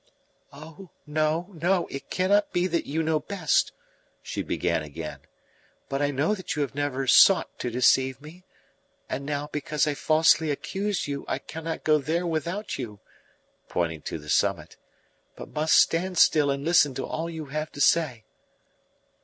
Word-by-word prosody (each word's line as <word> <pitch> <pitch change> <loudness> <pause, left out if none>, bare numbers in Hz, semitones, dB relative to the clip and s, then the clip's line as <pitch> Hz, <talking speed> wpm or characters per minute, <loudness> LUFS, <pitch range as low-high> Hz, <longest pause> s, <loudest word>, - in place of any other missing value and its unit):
"Oh 155 +6 -12 0.2
no, 155 +4 -1
no, 175 +1 +1
it 135 - -7
cannot 200 +3 +2
be 175 0 +1
that 170 -3 -1
you 160 +3 -1
know 160 -1 +1
best!" 160 0 0 0.5
she - - -4
began - - -1
again. 75 +1 -7 0.7
"But 135 +1 -2
I 145 - +2
know 145 +8 +1
that 185 -5 -4
you 150 - +1
have 140 - -5
never 140 -2 -2
sought 185 +8 +5
to 125 - -2
deceive 130 +2 +2
me. 155 +5 -13 0.6
And 140 - -4
now, 145 0 -2
because 150 +1 -1
I 150 - 0
falsely 160 +1 +3
accused 195 +7 -2
you, 140 -1 -4
I - - -1
cannot 160 0 -6
go 155 -1 +4
there 165 +5 -1
without 170 +5 -3
you" 105 -5 -6 0.7
pointing 80 -3 -2
to - - -4
the 75 -1 -13
summit - - 0 0.6
"but - - -9
must 155 +1 +2
stand 180 +2 +2
still 150 -3 +5
and 140 +1 -2
listen 155 -5 +4
to 135 - -3
all 165 +1 -4
you 160 -2 -6
have 155 0 -3
to - - -9
say." 145 -7 +2
155 Hz, 165 wpm, -26 LUFS, 140-170 Hz, 0.7 s, sought